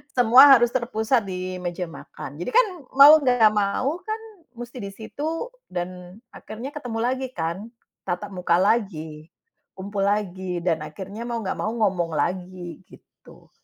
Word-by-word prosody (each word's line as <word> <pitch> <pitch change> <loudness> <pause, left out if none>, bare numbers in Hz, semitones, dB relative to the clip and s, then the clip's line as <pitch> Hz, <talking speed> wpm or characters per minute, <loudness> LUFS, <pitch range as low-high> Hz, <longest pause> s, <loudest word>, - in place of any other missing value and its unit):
semua 250 +3 +8
harus 240 0 +2
terpusat 235 -2 0
di 185 0 -5
meja 180 0 -4
makan. 145 -2 -10
Jadi 175 - -4
kan, - - +6 0.3
mau 290 +3 +9
enggak 245 -6 +4
mau 215 - 0
kan, 435 +3 -5 0.3
musti 240 +1 -9
di 200 - -5
situ, 310 - -5 0.2
dan 180 0 -6 0.2
akhirnya 235 +6 -8
ketemu 245 -7 -5
lagi 260 +2 -1
kan. 170 +6 -3 0.4
Tatap 195 +3 -3
muka 180 -2 0
lagi, 160 -7 -1 0.5
kumpul 195 +1 -4
lagi, 190 -3 -2
dan 165 -3 +1
akhirnya 195 +8 -8
mau 235 -1 -3
enggak 190 - -3
mau 215 - -1
ngomong 185 -7 0
lagi, 175 +1 -3
gitu. - - -19
205 Hz, 145 wpm, -23 LUFS, 180-240 Hz, 0.5 s, mau